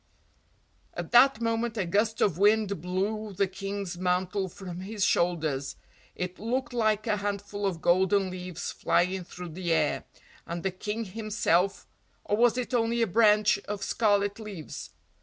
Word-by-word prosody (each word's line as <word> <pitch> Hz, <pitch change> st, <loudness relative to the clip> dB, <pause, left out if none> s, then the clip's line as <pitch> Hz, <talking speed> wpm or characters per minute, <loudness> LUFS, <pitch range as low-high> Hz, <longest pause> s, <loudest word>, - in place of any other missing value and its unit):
At -, -, -5 dB
that 245 Hz, -1 st, +6 dB
moment 230 Hz, 0 st, -1 dB
a 200 Hz, -, 0 dB
gust 210 Hz, +5 st, +1 dB
of 180 Hz, -4 st, +2 dB
wind 205 Hz, -3 st, +3 dB
blew 200 Hz, +4 st, -2 dB
the 200 Hz, +1 st, +2 dB
King's 195 Hz, -1 st, -5 dB
mantle 185 Hz, +1 st, 0 dB
from 180 Hz, -1 st, -8 dB
his 200 Hz, +1 st, -1 dB
shoulders; 155 Hz, -6 st, 0 dB, 0.4 s
it 180 Hz, 0 st, -4 dB
looked 245 Hz, +4 st, -2 dB
like 215 Hz, -3 st, +1 dB
a 215 Hz, -2 st, +1 dB
handful 205 Hz, 0 st, -3 dB
of 170 Hz, -4 st, -4 dB
golden 190 Hz, +2 st, +3 dB
leaves 180 Hz, -2 st, -5 dB
flying 185 Hz, +1 st, +1 dB
through 180 Hz, 0 st, -9 dB
the 175 Hz, +1 st, -3 dB
air, 165 Hz, -, +1 dB, 0.4 s
and 170 Hz, 0 st, -4 dB
the 190 Hz, -, 0 dB
King 210 Hz, +5 st, -4 dB
himself 200 Hz, -3 st, 0 dB, 0.4 s
or 205 Hz, -, 0 dB
was 240 Hz, +1 st, +3 dB
it 250 Hz, +1 st, -3 dB
only 235 Hz, 0 st, +2 dB
a -, -, +4 dB
branch 210 Hz, 0 st, +4 dB
of 205 Hz, -1 st, -4 dB
scarlet 205 Hz, -2 st, +1 dB
leaves? 200 Hz, -8 st, -7 dB
200 Hz, 155 wpm, -28 LUFS, 180-215 Hz, 0.4 s, that